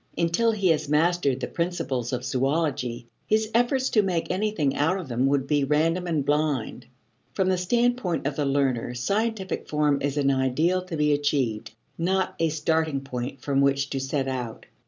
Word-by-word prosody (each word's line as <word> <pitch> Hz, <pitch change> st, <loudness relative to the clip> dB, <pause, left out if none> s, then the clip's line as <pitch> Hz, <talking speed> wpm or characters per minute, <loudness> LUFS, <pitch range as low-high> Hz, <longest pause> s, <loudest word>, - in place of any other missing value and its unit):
Until 170 Hz, +8 st, +2 dB
he 200 Hz, -4 st, +1 dB
had 155 Hz, -3 st, +1 dB
mastered 150 Hz, -3 st, +2 dB
the -, -, -2 dB
principles 135 Hz, -8 st, -2 dB
of 125 Hz, 0 st, -3 dB
zoology, 130 Hz, -3 st, -1 dB, 0.2 s
his 215 Hz, 0 st, +1 dB
efforts 250 Hz, +3 st, +2 dB
to 215 Hz, -, +4 dB
make 180 Hz, -4 st, -1 dB
anything 185 Hz, -9 st, 0 dB
out 165 Hz, +6 st, +1 dB
of 185 Hz, -, -6 dB
them 125 Hz, +1 st, +1 dB
would 140 Hz, -1 st, +1 dB
be 145 Hz, 0 st, +1 dB
random 165 Hz, +5 st, +1 dB
and 155 Hz, -5 st, 0 dB
blind. 145 Hz, -4 st, -1 dB, 0.5 s
From 190 Hz, -1 st, +1 dB
the 185 Hz, -, +2 dB
standpoint 235 Hz, -, 0 dB
of 145 Hz, 0 st, -1 dB
the 145 Hz, -, -1 dB
learner 135 Hz, -3 st, 0 dB
scientific 200 Hz, -, -2 dB
form 150 Hz, -2 st, +1 dB
is 145 Hz, +1 st, -1 dB
an 140 Hz, -1 st, +3 dB
ideal 140 Hz, +8 st, +1 dB
to 170 Hz, -3 st, -5 dB
be 150 Hz, 0 st, +3 dB
achieved, 135 Hz, -7 st, -1 dB, 0.2 s
not 185 Hz, +2 st, 0 dB
a 165 Hz, -, +2 dB
starting 155 Hz, -1 st, 0 dB
point 130 Hz, 0 st, -5 dB
from 140 Hz, 0 st, +1 dB
which 140 Hz, 0 st, +1 dB
to 135 Hz, -, -1 dB
set 135 Hz, +1 st, -2 dB
out. 125 Hz, -4 st, -4 dB
150 Hz, 175 wpm, -25 LUFS, 135-180 Hz, 0.5 s, to